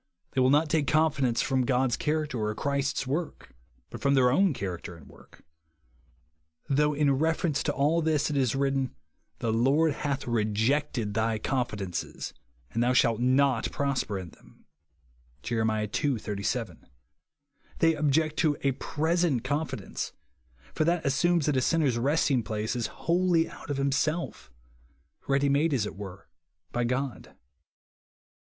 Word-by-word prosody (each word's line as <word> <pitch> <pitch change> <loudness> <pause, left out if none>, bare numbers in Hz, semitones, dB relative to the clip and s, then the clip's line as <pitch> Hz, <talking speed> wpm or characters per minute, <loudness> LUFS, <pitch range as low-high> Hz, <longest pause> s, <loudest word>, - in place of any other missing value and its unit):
They 130 - +1
will 130 - +4
not 150 +3 +4
take 155 -2 +1
confidence 140 -6 +2
from 130 -1 +1
God's 125 0 +1
cliaracter 155 -1 -1
or 105 -3 -2
Christ's 140 +1 -1
work, 155 +6 -4 0.4
but - - -8
from 140 0 +3
their 125 -2 +4
own 190 +6 +4
character 90 - -5
and 75 -5 -15
work; - - -18 1.2
though 150 +1 +2
in 140 -2 +2
refer 160 +2 +1
ence 145 - -1
to 145 - 0
all 150 +4 +2
this 155 -1 +1
it - - -2
is 130 -3 +1
written, 135 -1 0 0.4
"The 115 -1 -1
Lord 140 +7 +3
Jiath 140 -1 -2
rejected 110 +1 0
thy 110 +1 0
confidences, 105 - -3 0.4
and 115 - -1
thou 125 +1 +3
shalt 115 -3 +3
not 130 -1 +2
prosper 135 -7 -1
in 90 -3 -7
them," - - -21 0.8
(Jer. 115 -2 -1
ii. 110 +6 0
37). 100 -2 -3 0.9
They 165 0 +4
object 155 +1 +1
to 155 -3 +2
a 140 - +2
present 160 -1 0
confidence, 135 -5 -3 0.6
for - - +1
that 170 0 +1
assumes 160 +3 +2
that 150 -3 +1
a - - +2
sinner's 140 -5 +2
resting 140 0 +2
place 110 +1 -3
is 120 -2 -1
wJiolli/ 170 -1 +1
out - - -12
of 145 - -1
himself, 140 - -1 0.3
— 70 +1 -36
ready 140 +1 +2
made, 140 +2 +2
as 110 -5 0
it - - -6
were, 95 -1 -9 0.4
by 120 0 0
God. 130 +2 -3
135 Hz, 150 wpm, -28 LUFS, 115-150 Hz, 1.2 s, will